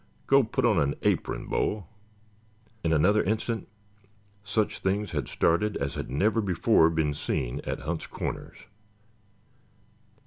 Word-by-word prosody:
Go 140 0 +6
put 115 +1 -1
on 110 -7 +4
an 70 0 +1
apron, - - 0
Bo!" 105 -4 -1 1.0
In 80 - +1
another 95 +7 +4
instant 110 +1 -2 0.8
such 105 0 -1
things 100 0 -1
had 75 -6 -2
started 105 +6 +1
as 70 0 -2
had - - -5
never 105 - +2
before 90 -2 +3
been 80 -3 0
seen 65 -3 -2
at - - -3
Hunt's 80 +3 -4
Corners. - - -5
95 Hz, 130 wpm, -27 LUFS, 80-105 Hz, 1.0 s, Go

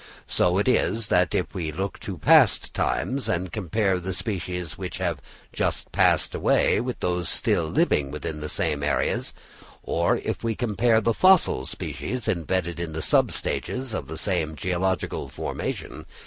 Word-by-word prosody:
So 90 +1 +1
it 100 - +1
is 115 -3 +1
if - - +2
we 80 -4 -3
look 95 +5 -4
to 95 -3 -6
past 75 - +4
times, 135 +1 0
and 90 +1 -1
compare 95 -1 0
the 95 +2 -4
species 90 -5 -4
which 90 -2 -5
have 85 -6 -2 0.3
just - - -2
passed - - +3
away - - +2
with 125 0 -4
those 90 -1 0
still - - +1
living 70 -2 +1
within 75 +1 -5
the 75 - -4
same 75 -1 0
areas; 70 0 0 0.5
or 85 +1 +1
if - - -4
we 115 -1 0
compare 115 0 +2
the 115 +1 +2
fossil 185 - +4
species 125 -3 -5
embedded 85 0 -1
in 85 -2 -4
the 80 - -3
sub - - +3
stages 130 -2 -3
of 70 - -3
the - - -6
same 80 0 -1
geological 95 +4 -1
formation. - - -5
90 Hz, 160 wpm, -25 LUFS, 80-110 Hz, 0.5 s, past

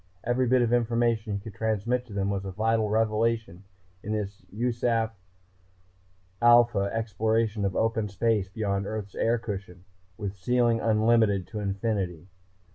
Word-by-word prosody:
Every 125 +1 +1
bit 125 0 +4
of 120 0 +1
information 115 -2 +1
he 100 - -2
could 105 0 -9
transmit 110 +4 -1
to 105 - -10
them 100 0 -1
was 100 -1 -2
a 95 - -5
vital 110 +2 +1
revelation 110 -3 0 0.4
in 105 - -4
this 100 -2 -4
USAF 115 0 0 1.3
Alpha 120 -4 +5
exploration 110 -1 0
of 95 - -1
open 110 -1 +1
space 100 -1 0
beyond 100 -1 -2
Earth's 105 -3 -5
air 115 +1 +1
cushion, 95 -5 -7 0.3
with 100 -3 -4
ceiling 120 +4 +2
unlimited 110 -3 +3
to 110 - -5
infinity. 100 -4 -2
110 Hz, 140 wpm, -27 LUFS, 100-115 Hz, 1.3 s, Alpha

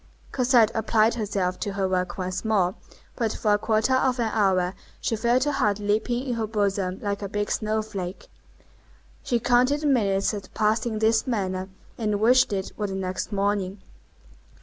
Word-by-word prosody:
Cosette 245 -4 +4
applied 220 0 +2
herself 195 -5 -2
to 200 - -3
her 195 -1 0
work 180 -1 -1
once 185 0 -3
more, 200 -5 +2 0.4
but 225 -3 0
for 210 -2 +1
a - - +4
quarter 220 +3 +1
of 260 -1 +2
an 225 -2 0
hour 190 -4 +2 0.3
she 225 - -1
felt 240 +3 +2
her 295 - 0
heart 210 -7 +1
leaping 215 +4 0
in 250 - -1
her 225 -2 -2
bosom 200 -3 -1
like 200 0 -2
a 200 - -4
big 205 +1 -2
snow 215 0 0
flake. 190 -4 -6 0.9
She 240 - 0
counted 250 +5 +3
the - - -3
minutes 200 -8 +2
that 200 -3 -7
passed 215 +2 +1
in 220 -2 -2
this 220 +2 +2
manner, 190 -5 -2 0.3
and 210 -2 0
wished 250 +3 +4
it 190 -2 -3
were 210 - -1
the 195 - -4
next 185 +2 -3
morning. 200 -1 -1
210 Hz, 180 wpm, -25 LUFS, 195-230 Hz, 0.9 s, Cosette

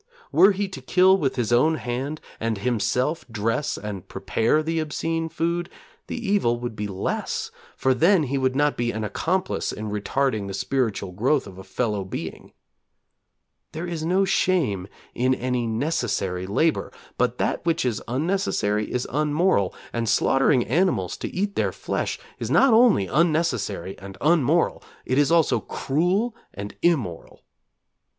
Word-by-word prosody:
Were 200 - +6
he 200 +1 -1
to 165 -8 -8
kill 185 +8 +5
with 140 -9 0
his 120 -2 0
own 155 +7 +4
hand, 135 +3 -4 0.2
and 115 -1 -1
himself 125 +7 0
dress 115 +5 -1
and 100 -3 -6
prepare 110 +10 +1
the 165 +1 -1
obscene 165 +1 -2
food, 170 +2 -1 0.4
the - - -4
evil 200 - +1
would 120 -2 -5
be 105 0 -3
less, 95 -1 -3 0.3
for 130 - +3
then 170 +6 +4
he 140 0 -1
would 130 0 +1
not 145 +1 +2
be 120 0 -1
an 110 -2 -3
accomplice 170 - -1
in 105 0 -5
retarding 105 +1 -1
the 95 - -4
spiritual 110 -5 -1
growth 130 +9 +1
of 95 -2 -11
a - - -8
fellow 105 -4 -2
being. 95 - -7 1.2
There 160 +3 -4
is 170 -3 -4
no 185 +4 +2
shame 150 - +1 0.3
in 130 +1 +2
any 125 -1 -1
necessary 110 - -1
labour, 155 +11 +1 0.3
but - - +1
that - - -1
which 165 -4 +1
is 115 -4 -1
unnecessary 125 - 0
is 125 - -1
unmoral, 150 - +2 0.2
and 115 -2 -1
slaughtering 135 -1 +3
animals 175 +9 +1
to - - -4
eat 200 +2 -2
their - - +1
flesh - - -3 0.2
is - - -3
not 270 -3 +5
only 220 - +5
unnecessary 150 - 0
and 95 0 -10
unmoral; 160 +1 +2 0.2
it 130 +2 +1
is 145 0 +3
also 165 -2 +4
cruel 185 - 0 0.2
and 100 +1 -6
immoral. 125 - -1
135 Hz, 155 wpm, -24 LUFS, 110-165 Hz, 1.2 s, Were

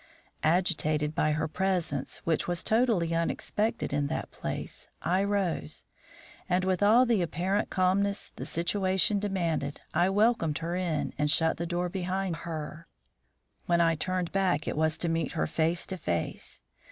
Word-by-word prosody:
Agitated 155 -3 +2
by 155 -1 +2
her 155 +1 0
presence, 175 -5 -1
which 165 -2 0
was 175 0 -1
totally 220 -8 +2
unexpected 170 +4 -1
in 145 0 +1
that - - -4
place, - - -5 0.2
I 185 +3 +2
rose, 195 - -1 0.6
and, 180 +1 +2
with 185 -1 +1
all 225 +5 +6
the 230 -5 +2
apparent 180 +5 0
calmness 200 +2 +1
the - - -6
situation 190 +3 +1
demanded, 170 -8 -1
I 175 +3 +3
welcomed 205 -6 +2
her 170 +1 -3
in 175 -4 -1
and 150 0 +2
shut 160 +1 +2
the 170 - -3
door 175 +1 -1
behind 185 -1 -2
her. 160 0 -6 0.8
When 170 -1 +3
I 165 -1 +4
turned 180 +2 -2
back 185 -6 +1
it - - -1
was 160 0 +1
to 170 - -2
meet 165 0 -1
her 160 - 0
face 165 +2 0
to 190 - -5
face. 85 - -3
175 Hz, 155 wpm, -29 LUFS, 160-190 Hz, 0.8 s, all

